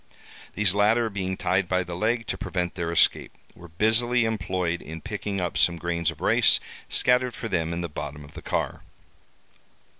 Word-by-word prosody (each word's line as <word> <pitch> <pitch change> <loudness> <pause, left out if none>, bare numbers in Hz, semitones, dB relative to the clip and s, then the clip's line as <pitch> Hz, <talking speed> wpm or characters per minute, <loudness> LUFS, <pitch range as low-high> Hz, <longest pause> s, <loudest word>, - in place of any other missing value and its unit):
These 100 -3 +3
latter 110 +3 +3
being 95 -1 -3
tied 90 +1 +1
by 90 0 +2
the 85 -1 -6
leg, 115 +5 0
to - - -2
prevent 90 -2 -3
their 85 -2 -3
escape, 85 - +2 0.2
were 85 - -13
busily 110 +7 +2
employed 90 -5 -1
in 80 +1 -8
picking 100 +5 -4
up 90 -1 -2
some 85 -1 +3
grains 85 -1 -1
of - - -8
rice - - +4 0.3
scattered 125 0 +2
for 115 - -5
them 80 -6 -1
in 85 +1 -3
the 85 - -2
bottom 75 -1 -7
of - - -16
the - - -9
car. - - -2
90 Hz, 180 wpm, -25 LUFS, 85-110 Hz, 0.3 s, rice